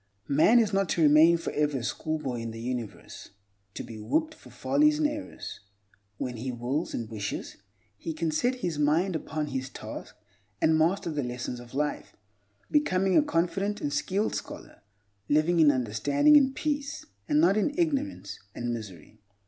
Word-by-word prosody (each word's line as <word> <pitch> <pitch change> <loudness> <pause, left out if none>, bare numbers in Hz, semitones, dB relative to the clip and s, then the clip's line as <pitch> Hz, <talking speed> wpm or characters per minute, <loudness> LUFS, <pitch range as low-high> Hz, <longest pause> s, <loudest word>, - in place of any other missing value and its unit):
Man 155 +12 +5
is 215 -3 +3
not 195 -1 +1
to 170 - 0
remain 155 +3 +6
forever 150 -3 -1
a 120 - -5
schoolboy 145 -2 -3
in 115 - -4
the 115 0 -8
universe, 120 -2 -6 0.5
to - - -4
be 110 -2 -9
whipped 315 - 0
for - - -16
follies 300 +1 +2
and 305 -1 +3
errors. 300 0 -7 0.6
When 125 0 -4
he 125 +3 -3
wills 125 +6 -2
and 115 - -4
wishes, 105 -3 -5 0.4
he 165 - -4
can 160 0 -2
set 245 +11 +1
his 160 -4 -2
mind 160 +5 +2
upon 155 -1 -3
his 130 -1 -3
task - - -8 0.4
and 160 - +3
master 170 +2 +1
the 150 -2 -1
lessons 125 -1 -4
of 120 +1 -12
life, 150 +1 -2 0.6
becoming 195 -11 +2
a - - +7
confident 200 - -1
and 145 - -3
skilled 195 +8 0
scholar, - - -7 0.5
living 155 +4 +3
in 155 -2 +7
understanding 130 - +3
and 270 -2 +5
peace, 290 -1 -3 0.2
and 150 - +3
not 175 +5 +5
in 215 +7 +1
ignorance 295 -4 -1 0.2
and 120 0 -2
misery. 105 -2 -9
155 Hz, 165 wpm, -28 LUFS, 125-200 Hz, 0.6 s, a